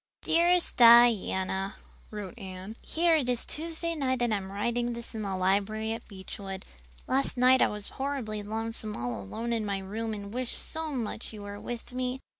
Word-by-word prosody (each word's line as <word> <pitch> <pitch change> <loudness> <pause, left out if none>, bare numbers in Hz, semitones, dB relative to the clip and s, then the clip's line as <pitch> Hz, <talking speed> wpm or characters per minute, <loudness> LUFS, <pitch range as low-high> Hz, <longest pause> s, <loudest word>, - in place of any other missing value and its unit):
"Dearest 345 +1 +3
Diana" 215 -5 +5 0.3
[wrote 210 0 -6
Anne], 190 -1 -8
"Here 335 0 +3
it 260 -5 -1
is 245 -2 0
Tuesday 335 +1 -2
night 260 -5 0
and 235 -2 +2
I'm 195 -2 -3
writing 235 +4 -1
this 235 0 -4
in 220 - -4
the 195 -2 -2
library 205 +4 +1
at 230 - -7
Beechwood. 195 0 -7 0.4
Last 270 0 +1
night 255 +1 +6
I - - +6
was 210 -1 -5
horribly 265 -6 -3
lonesome 220 0 -3
all 120 -3 -3
alone 230 - -3
in 225 -2 0
my 200 -2 -1
room 215 +3 -4
and 200 0 -7
wished 250 -1 0
so 320 0 -1
much 230 -5 -3
you 210 -1 -8
were 205 0 -7
with 240 +2 -6
me. 255 +1 -2
225 Hz, 180 wpm, -29 LUFS, 200-250 Hz, 0.4 s, night